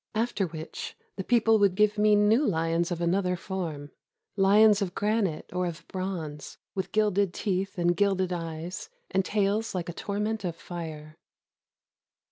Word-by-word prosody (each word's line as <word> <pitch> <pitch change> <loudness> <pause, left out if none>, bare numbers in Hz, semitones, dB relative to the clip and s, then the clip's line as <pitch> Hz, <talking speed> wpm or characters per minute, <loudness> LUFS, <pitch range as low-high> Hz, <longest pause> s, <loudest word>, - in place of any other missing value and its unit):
After 220 -4 0
which 160 -1 -7 0.2
the 190 - -4
people 225 0 +4
would 200 -3 +3
give 210 +1 +3
me 210 0 +5
new 210 +6 +4
lions 165 - +1
of 175 -1 -3
another 180 +1 +1
form, 170 -6 -5 0.2
— - - -58
lions 205 +1 +5
of 185 -3 -2
granite 205 -6 0
or 180 0 0
of 165 -2 -7
bronze, 175 -6 -5 0.2
with 190 - -3
gilded 205 -3 +2
teeth 195 0 -2
and 175 0 +2
gilded 190 -2 +1
eyes, 165 +1 -5 0.2
and 190 0 +2
tails 205 +2 0
like 175 -2 -3
a - - -4
tor 200 +3 -4
ment 215 0 -1
of 175 -3 -2
fire. 155 -3 -8
190 Hz, 160 wpm, -28 LUFS, 170-205 Hz, 0.2 s, me